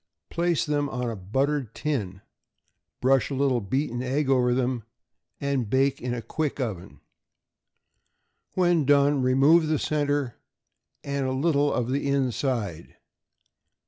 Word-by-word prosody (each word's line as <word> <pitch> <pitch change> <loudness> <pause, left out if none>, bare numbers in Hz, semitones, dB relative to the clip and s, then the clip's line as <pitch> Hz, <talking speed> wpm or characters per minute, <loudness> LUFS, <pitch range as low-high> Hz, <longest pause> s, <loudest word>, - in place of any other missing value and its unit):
Place 170 -1 +1
them 145 -1 0
on 125 -2 -3
a - - -5
buttered 130 +5 -1
tin, 105 -11 -3 0.8
brush 135 +1 +3
a 140 - -3
little 130 -3 +1
beaten 120 +4 -2
egg 135 +2 0
over 125 -2 +3
them, 125 -1 0 0.6
and 135 -6 -1
bake 135 +3 +1
in 125 - -3
a 120 -2 -4
quick 150 +5 -3
oven. 105 -9 -5 1.5
When 175 -3 +3
done, 140 0 +3
remove 140 +6 +4
the 155 0 +1
centre 145 -4 -1 0.6
and 140 -1 -2
a - - -1
little 145 0 +2
of 125 0 -1
the 140 +1 -1
inside. 125 - -2
135 Hz, 130 wpm, -26 LUFS, 125-145 Hz, 1.5 s, remove